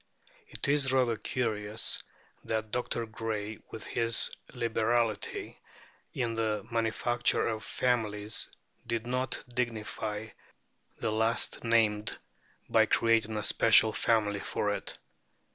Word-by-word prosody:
It 430 - -4
is 140 -2 +3
rather 125 -3 +3
curious 110 -2 -1 0.4
that 110 -1 -2
Dr. 120 -1 -2
Gray 110 -1 -4
with 110 - -8
his 115 -1 +2 0.2
liberality 115 -1 0 0.6
in 120 -3 -1
the 110 -3 -1
manufacture 115 +1 +1
of 110 -1 -2
families 110 -4 -1 0.4
did 115 -1 -1
not 125 +1 -1
dignify 110 -2 -3 0.7
the 110 - -1
last 110 +2 +1
named 110 -3 +2 0.5
by - - +4
creating 115 -1 +2
a 105 - -2
special 110 0 +5
family 105 -3 +1
for - - -1
it. - - -5
115 Hz, 110 wpm, -30 LUFS, 110-120 Hz, 0.7 s, special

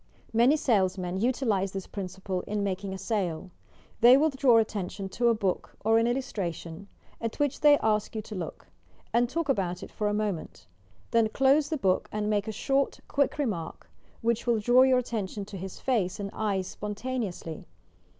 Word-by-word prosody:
Many 240 +7 +5
salesmen 190 - +1
utilize 220 -5 0
this 195 -1 -4
principle 190 -1 -4
in 210 0 -1
making 195 0 -2
a 190 - -4
sale. 185 -4 -2 0.5
They 245 +3 +8
will 310 +2 +3
draw 265 -3 +4
atten 210 -4 0
tion 195 -2 -6
to 240 +4 0
a 230 - +4
book 195 -4 -2
or 225 +1 +5
an 230 - +2
illustration, 195 -8 -3 0.3
at 230 -1 -3
which 290 -1 0
they 295 -1 +7
ask 215 0 +1
you 215 - -3
to 215 - -9
look, 180 -5 -6 0.5
and 240 0 +3
talk 330 +3 -2
about 185 -9 -1
it - - -9
for 210 - -2
a - - +1
moment; 205 -6 -3 0.5
then 230 -1 +3
close 275 +5 +3
the 315 - -1
book 190 -8 +1
and 210 0 -1
make 205 0 0
a - - -1
short, 270 +5 0
quick 280 -1 +1
remark, 210 - -4 0.3
which 235 +1 0
will 235 -1 +3
draw 245 +4 +5
your 260 -1 +5
attention 210 -5 -3
to 205 - -10
his 190 0 -7
face 215 -9 0
and 200 -1 -4
eyes 200 -3 -1
spontaneously. 210 -5 -5
215 Hz, 180 wpm, -28 LUFS, 190-245 Hz, 0.5 s, They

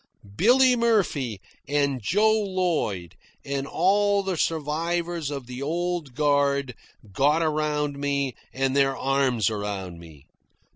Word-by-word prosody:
Billy 250 - +5
Murphy, 190 - +1 0.3
and 140 -2 0
Joe 210 - +3
Lloyd, 180 - -1 0.3
and 140 0 -3
all 200 +4 +2
the 190 -1 -2
survivors 165 +1 -1
of 140 -3 -5
the 125 +2 -8
old 170 -2 -2
guard, 140 -2 +1 0.4
got 150 - +2
around 150 -2 -1
me 140 -2 -1 0.2
and 135 0 -1
their 135 -1 +2
arms 130 -6 +1
around 100 -4 -5
me. 80 -5 -15
145 Hz, 115 wpm, -25 LUFS, 135-175 Hz, 0.4 s, Billy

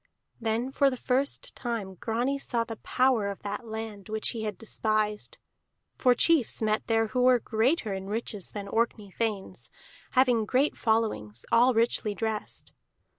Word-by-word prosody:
Then 230 +3 -1
for 275 0 +4
the 255 - -4
first 265 +3 0
time 230 -6 -4
Grani 240 +8 -1
saw 235 -4 -1
the 225 -1 -7
power 250 -5 +2
of 200 - -7
that 205 +4 -5
land 220 -2 -6
which 220 0 -1
he 230 - -3
had 210 -3 -3
despised, 215 -1 -1 0.6
for 250 -1 +4
chiefs 315 -3 +3
met 215 -1 0
there 225 -1 +2
who 250 +3 0
were 250 0 +6
greater 225 +1 0
in 190 0 -5
riches 210 -2 -3
than 200 -1 -6
Orkney 220 -2 -1
thanes, 210 -2 -3 0.4
having 250 -4 +4
great 265 +5 +2
followings, 215 - 0
all 245 +1 +5
richly 225 -2 +1
dressed. 220 -1 -4
225 Hz, 155 wpm, -28 LUFS, 210-245 Hz, 0.6 s, were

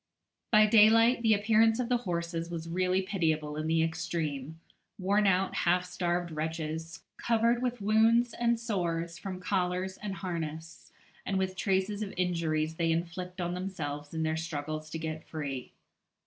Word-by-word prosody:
By 215 -1 +7
daylight, 225 +3 +6
the 220 -2 +4
appearance 220 +2 +3
of 250 - 0
the 250 0 +2
horses 170 -1 -2
was 165 -1 -5
really 185 +2 +1
pitiable 160 -6 -1
in 155 +1 -3
the 160 0 +3
extreme 160 -2 -3 0.4
worn 200 +2 +2
out, 190 0 +2
half 180 +1 +2
starved 175 -1 -2
wretches, 160 +1 -4
covered 235 +1 +2
with 245 -3 -2
wounds 225 +3 +4
and 235 -1 +1
sores 170 -7 -2
from 190 -2 -5
collars 185 0 -1
and 205 -2 -4
harness, 165 -2 -6 0.3
and 195 - -1
with 190 0 -1
traces 195 +2 0
of 205 -2 -4
injuries 160 -3 0
they 165 -1 +1
inflict 180 +2 -3
on 175 0 -1
themselves 155 -6 -5
in 160 -1 -2
their 160 0 0
struggles 155 -1 -4
to 160 - -4
get 160 0 -5
free. 140 -5 -5
180 Hz, 155 wpm, -30 LUFS, 160-205 Hz, 0.4 s, By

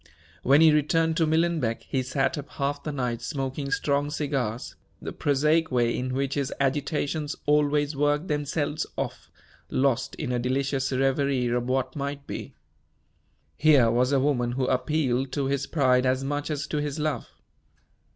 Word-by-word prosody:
When 140 +4 +5
he 160 -1 +7
returned 160 +2 +2
to 165 -3 +3
Millenbeck, 160 -7 +1
he 135 - -1
sat 135 +5 0
up 145 -1 -7
half 145 0 -2
the 150 - -4
night 125 -4 -2
smoking 135 +2 -3
strong 140 +1 0
cigars 135 -6 -2 0.2
the - - -6
prosaic 150 +3 +2
way 120 -2 +2
in 130 0 -2
which 135 0 -1
his 140 -2 -1
agitations 145 +2 -1
always 150 0 +2
worked 145 +4 +1
themselves 150 0 -1
off - - -4 0.4
lost 130 -2 0
in 145 -5 -4
a 125 - 0
delicious 135 +2 -1
reverie 135 0 +1
of 120 0 -1
what 130 0 0
might 140 0 -4
be. - - -7 1.0
Here 140 -7 +5
was 125 +3 +2
a 140 - +3
woman 125 -3 +1
who 130 +1 0
appealed 130 0 0
to 140 -2 0
his 135 0 -1
pride 130 -4 +3
as 130 +1 +1
much 145 +2 -2
as 150 -1 -2
to 150 - -3
his 145 -1 -2
love. 150 -5 -2
140 Hz, 160 wpm, -26 LUFS, 130-150 Hz, 1.0 s, he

